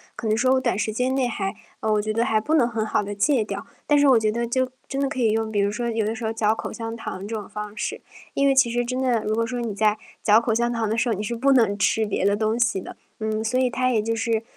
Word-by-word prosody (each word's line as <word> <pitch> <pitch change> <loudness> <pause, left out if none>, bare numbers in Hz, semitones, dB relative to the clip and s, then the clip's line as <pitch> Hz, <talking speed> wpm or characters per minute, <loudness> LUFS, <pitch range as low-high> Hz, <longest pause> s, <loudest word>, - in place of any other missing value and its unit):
可 245 - -7
能 215 - +2
说 255 +3 +3
我 265 - +3
短 205 - 0
时 215 0 -1
间 250 +4 0
内 260 -2 +1
还 195 -4 -3 0.3
呃， 220 - 0
我 210 -1 +2
觉 215 +1 -2
得 230 - +1
还 220 -2 +2
不 290 +9 -2
能 280 -7 +5
很 225 -2 -2
好 215 - 0
地 205 0 -5
戒 235 +4 +2
掉， 200 +1 -6 0.2
但 295 -1 +4
是 285 - +5
我 260 -3 +6
觉 215 -1 +1
得 235 +2 -2
就 260 +1 0 0.2
真 275 0 -3
的 275 - +1
可 270 -2 -5
以 225 -3 +3
用 220 0 -1
比 210 - 0
如 200 0 +2
说 235 +3 -2
有 225 -1 0
的 220 +2 -1
时 230 - -7
候 220 - 0
嚼 220 -1 +1
口 - - -5
香 225 0 -5
糖 200 -3 -6
这 225 - -4
种 210 -2 -5
方 210 0 -6
式， 210 - -3 0.4
因 275 - +3
为 275 - +3
其 265 -3 +4
实 240 0 0
真 255 +1 -2
的 245 -4 +1
如 215 +1 0
果 230 - +1
说 245 +1 -4
你 230 -3 -3
在 215 0 +2 0.3
嚼 210 +1 +6
口 230 -1 0
香 240 +1 +1
糖 230 -2 -1
的 220 - -1
时 240 +1 +1
候， 225 - +2
你 205 - -3
是 235 +3 -3
不 275 +4 +2
能 225 -6 +3
吃 220 +2 +2
别 205 -2 -1
的 200 +1 +3
东 220 +1 0
西 235 -5 +1
的。 - - -11 0.3
嗯， 220 0 -2
所 235 +3 0
以 255 -1 +2
它 255 +1 0
也 225 -3 +2
就 230 +2 -1
是 225 -1 0
225 Hz, 340 characters per minute, -24 LUFS, 215-245 Hz, 0.4 s, 我